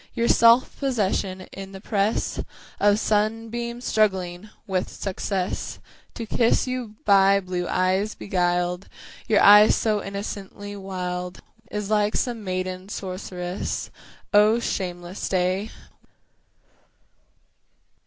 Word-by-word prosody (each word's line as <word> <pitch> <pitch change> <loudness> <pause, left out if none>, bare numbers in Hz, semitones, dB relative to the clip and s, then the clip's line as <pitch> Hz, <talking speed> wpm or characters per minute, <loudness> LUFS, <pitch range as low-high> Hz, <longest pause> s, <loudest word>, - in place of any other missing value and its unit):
Your 235 -1 +1
self 235 +2 +5
'possession 200 -7 -1
in 195 0 -9
the 195 - -8
press 205 +1 -1 0.4
Of 205 0 +4
sunbeams 225 +3 -1
struggling 190 -2 0 0.2
with 190 -3 -1
success 190 -1 -3 0.4
To 230 - -5
kiss 230 +1 +2
you 250 -4 -4
by 195 0 +5
blue 180 -2 -3
eyes 190 +3 +1
beguiled 180 -1 -1 0.4
Your 215 -2 +4
eyes 210 +1 +8
so 215 -2 0
innocently 200 0 -6
wild! 180 -2 -5 0.3
Is 210 0 -4
like 210 0 +2
some 235 -3 -1
maiden 185 0 -4
sorceress, 185 -2 -4 0.4
O 210 +3 +5
shameless 180 -4 -4
day! 185 +3 0
200 Hz, 105 wpm, -24 LUFS, 185-215 Hz, 0.4 s, eyes